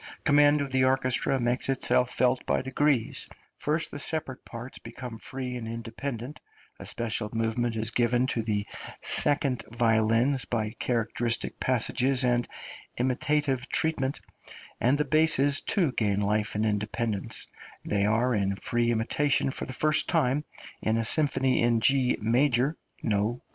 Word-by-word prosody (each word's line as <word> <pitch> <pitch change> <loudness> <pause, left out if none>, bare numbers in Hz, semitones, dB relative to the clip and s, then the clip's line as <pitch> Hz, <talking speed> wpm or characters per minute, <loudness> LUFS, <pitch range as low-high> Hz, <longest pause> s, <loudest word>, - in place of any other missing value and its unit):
Command 145 0 +5
of 140 -1 -3
the 130 0 +2
orchestra 130 0 +2
makes 120 +2 0
itself 125 -1 +2
felt 125 0 +1
by - - +1
degrees; 130 -2 0 0.3
first 155 +2 -1
the 145 - -6
separate 145 -4 -3
parts 120 +2 -9
become 120 -3 -8
free 130 +1 -5
and 115 -2 -5
independent, 115 +4 -6 0.4
a - - -8
special 110 -2 -2
movement 115 +1 -1
is 110 +1 0
given 120 +1 +2
to 120 -3 -1
the 105 -2 -1 0.4
second 135 -4 +1
violins 115 +3 +2
by 110 -3 -2
characteristic 115 0 -1
passages 130 +1 +1
and 120 -1 +1 0.5
imitative 130 +1 0
treatment, 140 -4 +1 0.6
and 130 +4 +3
the 150 - 0
basses 150 -2 +3
too 175 -9 +1
gain 105 -5 0
life 105 +1 0
and 105 +1 0
independence; 105 +1 -2 0.4
they 100 -1 0
are 115 +4 +2
in 100 -2 0
free 120 +3 -1
imitation 135 +5 +1
for - - -5
the - - -7
first 155 +3 +1
time 150 -3 +2 0.4
in 110 +1 +1
a 115 - -1
Symphony 135 -1 +2
in 120 -1 +3
G 130 +1 +3
major 125 +5 +2 0.3
(no 105 +1 0
K.) 125 - -17
125 Hz, 145 wpm, -27 LUFS, 115-135 Hz, 0.6 s, Command